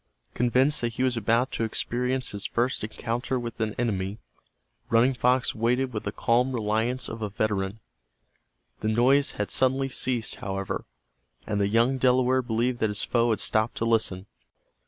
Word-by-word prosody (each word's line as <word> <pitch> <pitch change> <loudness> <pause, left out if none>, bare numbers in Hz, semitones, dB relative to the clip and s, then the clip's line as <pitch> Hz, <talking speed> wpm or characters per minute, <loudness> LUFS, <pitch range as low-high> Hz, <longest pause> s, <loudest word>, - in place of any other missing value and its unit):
Convinced 130 +5 +2
that 120 -1 -1
he 125 - -1
was 130 -1 +1
about 115 +3 +1
to - - -2
experience 125 +3 -1
his 100 -1 -3
first 120 0 -1
encounter 115 +4 -2
with 120 -1 -6
an 110 -1 -1
enemy, 100 -4 -1 0.7
Running 120 +4 +4
Fox 125 0 +2
waited 125 +3 0
with 105 - -4
the 100 - -1
calm 125 +5 +1
reliance 115 +3 -1
of 115 0 -7
a 105 - -2
veteran. 105 0 -2 1.0
The 110 - -1
noise 130 +6 +3
had 105 - -3
suddenly 130 +1 +2
ceased, 125 -3 -2
however, 95 -1 -4 0.6
and 105 -1 -1
the 100 - +2
young 120 +5 +2
Delaware 130 0 +3
believed 120 +1 -1
that 110 - +1
his 105 - -1
foe 120 -1 +2
had 110 -4 +1
stopped 110 +2 0
to 115 - -1
listen. 110 -5 0
115 Hz, 165 wpm, -26 LUFS, 110-125 Hz, 1.0 s, Running